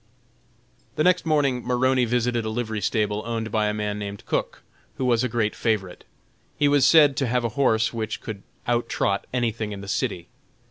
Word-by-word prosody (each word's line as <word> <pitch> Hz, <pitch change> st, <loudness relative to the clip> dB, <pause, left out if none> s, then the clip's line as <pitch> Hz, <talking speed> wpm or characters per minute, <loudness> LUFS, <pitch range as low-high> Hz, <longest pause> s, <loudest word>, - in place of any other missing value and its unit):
The 155 Hz, -, +1 dB
next 180 Hz, -1 st, +3 dB
morning 140 Hz, -5 st, +1 dB
Maroney 125 Hz, 0 st, +2 dB
visited 120 Hz, 0 st, 0 dB
a 110 Hz, -, -3 dB
livery 110 Hz, -2 st, -3 dB
stable 105 Hz, +1 st, 0 dB
owned 115 Hz, -1 st, -3 dB
by 105 Hz, -1 st, +1 dB
a 105 Hz, -, 0 dB
man 105 Hz, -1 st, -2 dB
named 100 Hz, 0 st, -6 dB
Cook, -, -, -2 dB, 0.3 s
who 130 Hz, -, -2 dB
was 120 Hz, -1 st, +2 dB
a 125 Hz, -, 0 dB
great 110 Hz, -2 st, 0 dB
favorite. 105 Hz, -6 st, -2 dB, 0.5 s
He 145 Hz, -, +3 dB
was 145 Hz, -1 st, +4 dB
said 150 Hz, -4 st, +6 dB
to 135 Hz, -, +1 dB
have 125 Hz, +1 st, 0 dB
a 115 Hz, -, 0 dB
horse 115 Hz, -2 st, +1 dB
which 110 Hz, -1 st, -3 dB
could 105 Hz, -3 st, -7 dB, 0.2 s
out 120 Hz, 0 st, 0 dB
trot 100 Hz, 0 st, -1 dB
anything 115 Hz, -3 st, -1 dB
in 100 Hz, -, -7 dB
the 100 Hz, -, -9 dB
city. 100 Hz, -5 st, -2 dB
115 Hz, 190 wpm, -24 LUFS, 105-125 Hz, 0.5 s, said